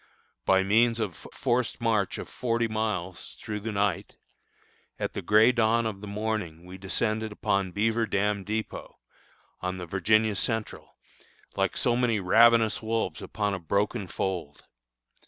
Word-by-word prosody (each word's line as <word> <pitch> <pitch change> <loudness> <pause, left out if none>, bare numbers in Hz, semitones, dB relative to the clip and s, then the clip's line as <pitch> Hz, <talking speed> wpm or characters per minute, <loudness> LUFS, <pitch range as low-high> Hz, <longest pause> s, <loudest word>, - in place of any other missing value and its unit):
By 95 0 +5
means 115 +4 +3
of 105 -4 -1 0.2
a - - -19
forced 120 0 0
march 110 -4 +1
of - - -6
forty 115 -1 -1
miles 105 -5 -3
through 105 -1 -4
the 110 +2 -4
night, 100 0 -1 0.8
at - - -3
the - - -4
gray 110 +3 +5
dawn 115 -1 +2
of 100 -3 -4
the 105 - -7
morning 100 -5 -3
we 90 +1 -10
descended 110 +3 -1
upon 100 -2 0
Beaver 115 +4 +1
Dam 100 0 0
dépôt, 110 +3 -4 0.6
on 90 0 -3
the 90 - -6
Virginia 105 +4 +2
Central, 110 +2 -3 0.6
like - - 0
so 120 - +2
many 120 -3 +1
ravenous 115 +3 +5
wolves 110 -7 -2
upon 105 -2 -2
a 95 - -3
broken 100 +3 -1
fold. 90 -6 -4
105 Hz, 150 wpm, -27 LUFS, 95-115 Hz, 0.8 s, By